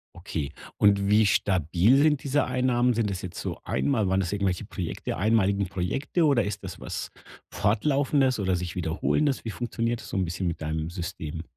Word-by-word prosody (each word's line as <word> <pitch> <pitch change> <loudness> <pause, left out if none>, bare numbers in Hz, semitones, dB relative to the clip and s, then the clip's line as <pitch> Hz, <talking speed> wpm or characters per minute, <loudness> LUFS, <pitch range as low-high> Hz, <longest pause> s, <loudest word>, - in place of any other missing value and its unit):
Okay, 80 -5 -4 0.3
und 100 -1 +4
wie 105 +1 +5
stabil 95 - +3
sind 150 -1 +3
diese 145 +1 +2
Einnahmen? 125 -1 +2
Sind 110 -2 0
das 95 -2 -4
jetzt 90 - -7
so - - -4
einmal 110 -9 0
waren 95 0 +2
das 95 +1 -1
irgendwelche 100 0 -1
Projekte 90 -5 -4
einmalige 100 -1 +2
Projekte 135 - -1
oder 135 -7 +3
ist 100 0 -4
das 95 - -7
was - - -5 0.4
Fortlaufendes 135 +3 +2
oder 95 -2 +1
sich 90 0 -5
Wiederholendes? 105 - 0
Wie 110 - -3
funktioniert 120 0 -2
das - - -10
so - - -3
'n 95 - +1
bisschen 90 +2 -3
mit 85 - -3
deinem 80 +1 -2
System? 85 -3 -5
100 Hz, 180 wpm, -26 LUFS, 90-125 Hz, 0.4 s, wie